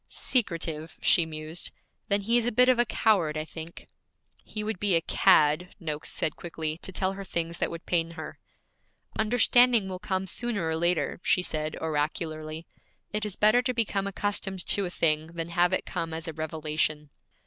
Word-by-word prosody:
'Secretive,' 165 - -2
she 170 -2 +6
mused. 155 +1 -3 0.4
'Then 200 0 +1
he 230 +4 +1
is 240 -1 +3
a - - +2
bit 250 +3 +5
of 255 -2 +4
a 240 - +5
coward, 180 -11 +2
I 155 - -2
think.' 160 +1 -9 0.6
'He 215 - -5
would 215 -3 -3
be 200 -3 +3
a 165 - +3
cad,' 155 +2 +3
Noakes 155 -4 -3
said 155 - 0
quickly, 160 -2 -4
'to 190 - -4
tell 190 +1 -1
her 195 0 -7
things 170 -2 -2
that - - +1
would 170 0 -8
pain 165 -2 +1
her.' - - -7 0.8
'Understanding 240 0 +4
will 185 -1 -5
come 190 -1 -1
sooner 205 -3 -2
or 160 - 0
later,' 170 -2 0
she 180 - +2
said 155 -2 -3
oracularly. 155 +1 -3 0.5
'It 210 0 -1
is 200 - -7
better 215 +4 +5
to 250 0 -2
become 200 -4 0
accustomed 195 -2 -2
to 200 - +1
a - - -5
thing 155 -3 +1
than 165 0 -4
have 175 +1 +3
it 185 - 0
come 165 -1 -3
as 160 0 -5
a 160 - -4
revelation.' 155 -1 -2
170 Hz, 185 wpm, -27 LUFS, 160-205 Hz, 0.8 s, she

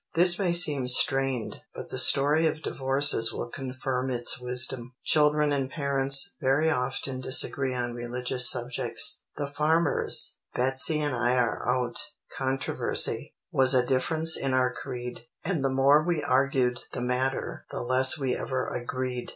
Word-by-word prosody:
This 175 +2 +4
may 185 -3 0
seem 150 -7 +4
strained, 135 -2 +1
but - - -10
the - - -1
story 150 +4 +4
of 155 0 -5
divorces 135 -3 +3
will 120 - -7
confirm 130 0 -5
its 120 0 +1
wisdom. 125 0 0
Children 150 -1 +2
and 135 -2 -3
parents 140 +3 +1
very 145 +4 +1
often 130 -1 -3
disagree 130 0 +2
on 120 -1 -4
religious 125 +1 0
subjects. 120 0 0 0.2
The 145 - -3
farmer's 150 +4 0 0.2
"Betsey 130 +5 +1
and 145 -3 -3
I 120 +1 0
are 120 -1 -2
out" 125 -1 -1 0.4
controversy, 135 0 0 0.2
"was 130 0 +2
a 125 -1 +2
difference 160 +6 +2
in 135 -1 -2
our 125 -1 0
creed. 120 -1 -9 0.2
And 165 -6 -1
the 135 - 0
more 135 +3 +3
we 170 -3 -2
argued 130 -2 0
the 125 - -5
matter, 125 +2 -4
the - - -6
less 130 +4 +4
we 130 -4 -2
ever 130 -1 -4
agreed." 125 0 -5
130 Hz, 150 wpm, -26 LUFS, 125-145 Hz, 0.4 s, This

